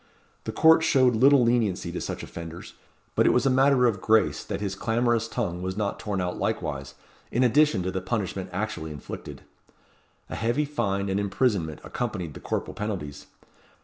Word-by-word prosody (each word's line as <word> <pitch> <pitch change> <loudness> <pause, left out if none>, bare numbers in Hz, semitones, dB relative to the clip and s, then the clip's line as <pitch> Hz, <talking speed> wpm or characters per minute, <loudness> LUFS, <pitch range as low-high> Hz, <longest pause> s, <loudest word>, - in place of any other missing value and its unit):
The - - -2
court 160 0 +6
showed 130 -6 +4
little 135 +3 +6
leniency 110 -7 +1
to 90 - -4
such - - -5
offenders; 85 0 -8 0.4
but - - +3
it - - +5
was 125 - +2
a 135 - +4
matter 130 -1 +4
of 105 -6 +1
grace 110 -1 +2
that - - -4
his 100 -2 -3
clamorous 115 +2 0
tongue 90 -8 -3
was 95 +1 -4
not 105 -2 -2
torn 105 -3 -3
out 90 -1 -3
likewise, 70 -1 -3 0.4
in 125 - +2
addition 125 -5 +3
to 95 - -2
the 95 0 -3
punishment 95 -3 -3
actually 90 -4 -3
inflicted. 75 -3 -8 0.8
A - - -6
heavy 120 +7 0
fine 100 -9 -1
and 95 +1 0
imprisonment 100 - 0
accompanied 95 -10 -4
the - - -9
corporal - - -3
penalties. 95 -10 -5
105 Hz, 175 wpm, -26 LUFS, 90-120 Hz, 0.8 s, court